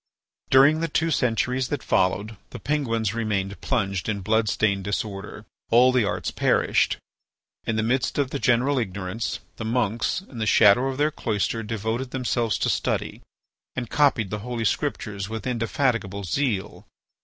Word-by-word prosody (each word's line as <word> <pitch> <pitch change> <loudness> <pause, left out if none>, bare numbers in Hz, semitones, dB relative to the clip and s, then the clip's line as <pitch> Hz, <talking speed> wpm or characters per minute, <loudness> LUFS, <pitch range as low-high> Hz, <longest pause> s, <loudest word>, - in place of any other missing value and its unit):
During 140 +4 +6
the 165 - 0
two 165 +1 0
centuries 125 0 +1
that 145 -3 -3
followed, 100 +4 +1
the - - -8
Penguins 115 -8 -1
remained 100 -4 -2
plunged 95 -4 -1
in 100 -2 -2
blood 110 +2 +1
stained 100 -3 +1
disorder. 100 +1 -4 0.2
All 125 +3 +6
the 125 -4 +2
arts 100 - -2
perished. - - +2 0.7
In 115 - 0
the 110 - +1
midst 125 +3 0
of 140 -2 0
the 140 - -2
general 130 +3 +2
ignorance, 100 +1 -3 0.2
the - - -5
monks 115 - 0
in 135 -11 -11
the 110 - -1
shadow 110 +6 +5
of 135 -1 -3
their 150 +2 +2
cloister 115 -2 -1
devoted 110 +3 -3
themselves 120 -3 0
to - - 0
study, - - -2 0.5
and 120 -2 -4
copied 135 -9 +2
the 105 - -2
Holy 115 +1 -3
Scriptures 105 -7 -2
with 110 0 -5
indefatigable 115 -4 -1
zeal. 105 - -2
115 Hz, 155 wpm, -24 LUFS, 105-130 Hz, 0.7 s, During